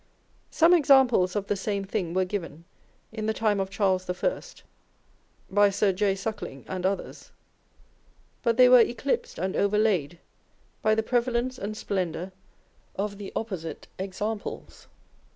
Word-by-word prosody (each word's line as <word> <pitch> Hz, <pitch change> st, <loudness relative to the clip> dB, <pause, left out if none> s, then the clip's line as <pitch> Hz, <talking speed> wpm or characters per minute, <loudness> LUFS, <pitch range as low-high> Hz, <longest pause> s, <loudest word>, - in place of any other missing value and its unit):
Some 330 Hz, +2 st, +4 dB
examples 265 Hz, -, +4 dB
of 205 Hz, -1 st, -1 dB
the 205 Hz, -, -1 dB
same 200 Hz, 0 st, -2 dB
thing 190 Hz, -4 st, -3 dB
were 185 Hz, 0 st, +2 dB
given 170 Hz, -4 st, -6 dB, 0.5 s
in 215 Hz, -1 st, -4 dB
the 220 Hz, -, 0 dB
time 210 Hz, -3 st, +1 dB
of 190 Hz, 0 st, -2 dB
Charles 190 Hz, -2 st, 0 dB
I. 340 Hz, -, -1 dB, 1.1 s
by 205 Hz, +1 st, +4 dB
Sir 200 Hz, 0 st, +1 dB
J. 195 Hz, +1 st, +1 dB
Suckling 195 Hz, -, -6 dB
and 185 Hz, 0 st, -1 dB
others, 195 Hz, 0 st, -5 dB, 1.1 s
but 235 Hz, -2 st, +1 dB
they 255 Hz, 0 st, +8 dB
were 250 Hz, 0 st, +8 dB
eclipsed 240 Hz, +4 st, 0 dB
and 185 Hz, +3 st, -2 dB
over 200 Hz, +1 st, +2 dB
laid 180 Hz, -7 st, +1 dB, 0.6 s
by 215 Hz, 0 st, +3 dB
the. 220 Hz, -, 0 dB
prevalence 245 Hz, +1 st, 0 dB
and 215 Hz, +2 st, -5 dB
splendour 185 Hz, -2 st, -3 dB, 0.6 s
of 200 Hz, 0 st, -3 dB
the 200 Hz, -, -7 dB
opposite 185 Hz, -8 st, -5 dB
examples. 205 Hz, +3 st, -5 dB
205 Hz, 140 wpm, -26 LUFS, 190-225 Hz, 1.1 s, they